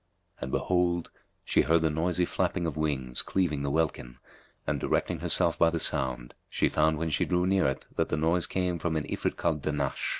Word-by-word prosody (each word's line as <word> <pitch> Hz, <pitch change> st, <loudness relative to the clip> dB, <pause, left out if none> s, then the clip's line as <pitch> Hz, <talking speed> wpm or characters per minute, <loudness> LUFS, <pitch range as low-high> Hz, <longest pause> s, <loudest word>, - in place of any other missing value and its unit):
And 65 Hz, -, -5 dB
behold, 90 Hz, -2 st, 0 dB, 0.3 s
she -, -, +3 dB
heard 80 Hz, +4 st, +3 dB
the 80 Hz, -, +2 dB
noisy 90 Hz, +3 st, +1 dB
flapping 85 Hz, 0 st, -1 dB
of 80 Hz, -4 st, -2 dB
wings 70 Hz, -5 st, -1 dB
cleaving 85 Hz, -7 st, 0 dB
the 70 Hz, -, -1 dB
welkin 70 Hz, -5 st, -1 dB, 0.5 s
and, -, -, -1 dB
directing -, -, 0 dB
herself -, -, +2 dB
by 85 Hz, -, +5 dB
the 85 Hz, 0 st, -2 dB
sound, 65 Hz, -5 st, 0 dB, 0.2 s
she -, -, +1 dB
found 80 Hz, 0 st, +2 dB
when 80 Hz, +1 st, -2 dB
she 70 Hz, -, +1 dB
drew 90 Hz, 0 st, +1 dB
near 95 Hz, -4 st, +3 dB
it 65 Hz, -, -3 dB
that -, -, +1 dB
the -, -, 0 dB
noise 85 Hz, +3 st, +2 dB
came 90 Hz, -2 st, -1 dB
from 80 Hz, 0 st, -1 dB
an 80 Hz, -, 0 dB
Ifrit -, -, -2 dB
called 75 Hz, -2 st, 0 dB
Dahnash. 75 Hz, -2 st, -1 dB
80 Hz, 200 wpm, -28 LUFS, 70-85 Hz, 0.5 s, by